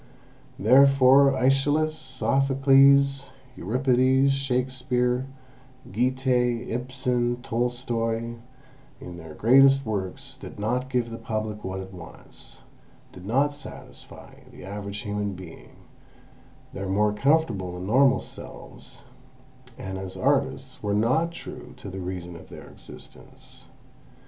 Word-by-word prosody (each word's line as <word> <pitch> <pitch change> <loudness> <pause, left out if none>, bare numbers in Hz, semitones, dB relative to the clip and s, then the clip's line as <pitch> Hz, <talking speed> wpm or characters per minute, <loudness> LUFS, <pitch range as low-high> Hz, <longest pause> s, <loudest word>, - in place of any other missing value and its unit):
Therefore 135 +3 +6
AEschylus, 145 +4 +2
Sophocles, 135 0 +3 0.3
Euripides, 130 +4 +2
Shakespeare, 125 -1 -1 0.6
Goethe, 125 +1 0
Ibsen, 125 0 -1
Tolstoy, 115 -1 -2 0.7
in 90 -1 -9
their 80 -2 -11
greatest 135 +3 +5
works 95 -4 -5
did - - -11
not 125 +5 -2
give 125 -3 -1
the 115 - -7
Public 110 -2 -4
what 95 0 -4
it 95 0 -10
wants, 85 -2 -12 0.5
did 90 +1 -12
not 140 +6 +1
satisfy 145 - -12
the - - -12
average 100 +1 -6
human 105 -2 -3
being, 90 -3 -12 1.0
their 100 0 -5
more 105 +2 +2
comfortable 105 - 0
and 90 - -6
normal 130 +6 +4
selves, - - -10 0.7
and 95 0 -6
as 95 0 -7
artists 135 +1 -1
were 105 -1 -1
not 130 +11 +2
true 170 - -10
to 100 - -9
the 95 - -7
reason 90 -1 -6
of 85 - -13
their - - -11
existence. - - -14
125 Hz, 110 wpm, -25 LUFS, 105-135 Hz, 1.0 s, Therefore